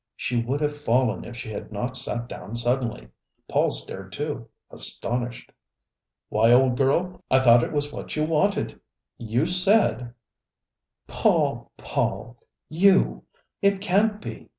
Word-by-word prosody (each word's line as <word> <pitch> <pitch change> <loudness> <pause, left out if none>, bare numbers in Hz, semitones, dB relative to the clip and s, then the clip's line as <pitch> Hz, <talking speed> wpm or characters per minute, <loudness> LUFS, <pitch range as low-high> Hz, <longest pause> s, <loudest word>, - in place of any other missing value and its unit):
She 120 0 -1
would 135 +5 -2
have 150 0 0
fallen 125 -5 0
if 120 - -9
she 110 - -7
had 105 - -7
not 120 +5 -3
sat 120 -2 -1
down 115 - -8
suddenly. 120 - -2 0.4
Paul - - +2
stared, 95 0 -5
too, 145 -3 -5 0.2
astonished. 120 0 -3 0.8
"Why, 115 +2 +3
old 125 0 +5
girl, 155 +8 0
I 130 - +5
thought 120 -2 +6
it - - -3
was 145 -1 -2
what - - -6
you 155 - 0
wanted! 165 +6 +1
I - - -20 0.4
you 120 +5 0
said 175 - +2 0.4
" - - -59
"Paul, - - +2
Paul! 120 - -2 0.3
You! 190 +4 +3 0.4
It 200 -1 +3
can't 205 +2 +1
be! - - -9
130 Hz, 145 wpm, -25 LUFS, 120-160 Hz, 0.8 s, thought